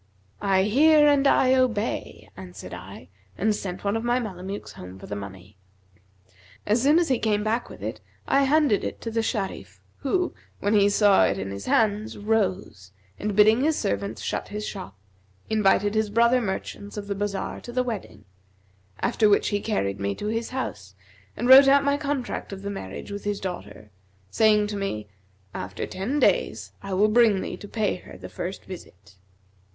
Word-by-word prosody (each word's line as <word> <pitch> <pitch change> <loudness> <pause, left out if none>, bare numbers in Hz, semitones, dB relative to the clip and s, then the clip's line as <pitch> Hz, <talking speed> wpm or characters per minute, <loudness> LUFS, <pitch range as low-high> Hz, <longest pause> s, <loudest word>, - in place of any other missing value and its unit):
'I 195 -2 +3
hear 295 +8 +5
and 285 -1 +4
I 260 -1 +4
obey,' 250 -5 -1
answered 90 -1 -10
I, 85 - -10 0.3
and 215 +3 +2
sent 185 -3 -5
one 200 +1 0
of 225 - -2
my 240 +1 +1
Mamelukes 195 -3 -6
home 90 +1 -10
for - - -11
the 105 - -5
money. 100 -1 -9 1.1
As 215 +3 +2
soon 290 +5 +5
as 345 -3 +2
he 255 -3 +2
came 210 -2 +1
back 225 +3 -1
with - - -11
it, - - -5 0.3
I 275 0 +3
handed 285 -6 +3
it - - -4
to 230 - -4
the 225 0 0
Sharif 210 -4 -4 0.2
who, 355 +6 -1 0.3
when 205 +2 0
he 205 -1 +5
saw 205 -1 +5
it 95 - 0
in 95 0 -4
his 100 +1 -7
hands, 215 -1 +1
rose, 195 - -2 0.3
and 210 -1 -2
bidding 215 +4 +5
his 310 +1 +2
servants 200 -1 -2
shut - - -3
his 210 +1 -5
shop, 185 - -7 0.5
invited 205 -1 +3
his 220 -1 +1
brother 235 +3 +3
merchants 205 0 -5
of 205 - -4
the 200 - -2
bazar 200 0 -3
the 245 +1 -2
wedding; 215 - -6 0.8
after 225 -3 +2
which 200 - +3
he 205 0 -1
carried 100 - -1
me 100 0 -2
to - - -7
his 225 +2 -2
house 105 - -5 0.4
and 240 - -1
wrote 270 +2 +9
out 280 +1 +5
my 280 0 +2
contract 285 -6 -3
of 195 0 -8
marriage 195 - -6
with 200 0 -6
his 205 -1 -2
daughter 105 - -7 0.4
saying 215 -1 +4
to 205 0 -4
me, 110 - -3 0.5
'After 95 0 -5
ten 230 +11 -3
days, - - +1
I 195 -1 -4
will 205 +3 +4
bring 215 -3 +4
thee - - -5
to 205 - -10
pay 210 -3 -1
her - - -13
the - - -9
first 185 +3 -6
visit.' 100 - -12
205 Hz, 180 wpm, -25 LUFS, 190-235 Hz, 1.1 s, wrote